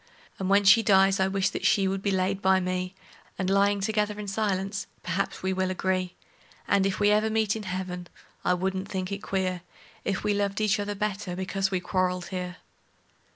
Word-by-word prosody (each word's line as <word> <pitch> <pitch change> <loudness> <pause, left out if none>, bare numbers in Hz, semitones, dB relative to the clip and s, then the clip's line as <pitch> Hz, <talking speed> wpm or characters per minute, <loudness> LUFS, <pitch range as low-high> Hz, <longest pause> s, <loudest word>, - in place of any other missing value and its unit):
And 190 -1 -2
when 200 +1 +5
she 210 +4 +7
dies 195 -1 +4
I 190 - +3
wish 195 0 0
that - - -5
she 195 -2 +3
would 190 0 -1
be 200 - 0
laid 190 0 0
by 190 0 +4
me, 185 0 -2 0.4
And, 190 0 -1
lyin' 200 0 +3
together 210 0 0
in 210 - -5
silence, 195 -1 -1 0.2
perhaps 185 +3 -2
we 190 0 +1
will 185 0 0
agree; 185 -1 -1 0.5
And, 195 -1 +3
if 195 - -2
ever 210 +1 +4
we 220 - -2
meet 220 -2 +2
in 220 - -4
heaven, 180 -2 -4 0.4
I 180 - +3
wouldn't 190 +1 -2
think 185 0 -3
it 200 - -3
queer 185 -3 -1 0.4
If 195 -1 -2
we 210 - +2
loved 200 0 -1
each 215 -1 +2
other 205 0 -2
the - - -14
better 200 -3 -2
because 190 +1 -1
we 185 -2 -1
quarreled 180 0 -1
here. 180 -1 -4
195 Hz, 200 wpm, -27 LUFS, 185-200 Hz, 0.5 s, she